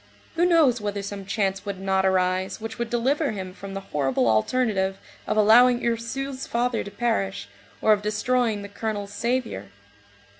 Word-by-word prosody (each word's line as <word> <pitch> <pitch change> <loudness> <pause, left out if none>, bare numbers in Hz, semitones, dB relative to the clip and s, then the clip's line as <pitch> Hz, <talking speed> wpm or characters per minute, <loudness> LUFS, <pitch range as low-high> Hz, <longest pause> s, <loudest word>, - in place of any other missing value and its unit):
Who 340 +2 +3
knows 310 -9 +4
whether 205 -1 -3
some 200 -1 -6
chance 195 -1 -1
would 200 -2 -5
not 190 0 +1
arise 185 +1 0
which 225 +1 -7
would 235 -1 -2
deliver 270 +6 +1
him 190 -2 -6
from 195 0 -8
the 195 - -4
horrible 135 -4 +1
alternative 190 - +1 0.3
of - - 0
allowing 240 +4 +6
Ursule's 260 +4 -3
father 240 0 0
to - - -7
perish, 205 -2 -1 0.4
or 215 - +6
of 205 - 0
destroying 215 +1 0
the - - -6
colonel's 205 -1 -4
saviour? 235 - -2
210 Hz, 160 wpm, -25 LUFS, 195-240 Hz, 0.4 s, allowing